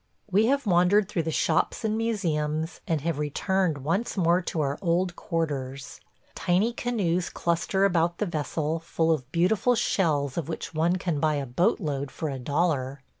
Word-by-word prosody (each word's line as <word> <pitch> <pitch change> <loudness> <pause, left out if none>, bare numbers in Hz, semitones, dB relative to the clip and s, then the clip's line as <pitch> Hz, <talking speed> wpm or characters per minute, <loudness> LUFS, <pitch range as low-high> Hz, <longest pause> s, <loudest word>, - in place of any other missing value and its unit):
We 210 +4 +4
have 280 0 +1
wandered 185 +2 +4
through 170 - -1
the 160 - -3
shops 220 - +1
and 215 0 +1
museums, 165 -8 -1
and 160 -5 0
have 165 -1 -2
returned 165 +3 0
once 195 +10 -1
more 175 0 +3
to 170 - -3
our 140 0 -1
old 180 0 +1
quarters. 140 -8 -3 0.3
Tiny 195 +7 +1
canoes 195 -9 -1
cluster 175 +3 0
about 170 -2 +1
the 210 - 0
vessel, 155 -1 -2
full 165 0 0
of 135 -4 -2
beautiful 200 +8 +2
shells 155 - +1
of 160 -2 -5
which 165 - -5
one 165 +3 +2
can 175 -5 -2
buy 155 0 +2
a 140 -1 -2
boat 175 - +1
load 140 -6 -3
for 155 - -4
a 135 -2 -4
dollar. 140 -1 -1
170 Hz, 175 wpm, -26 LUFS, 150-190 Hz, 0.3 s, We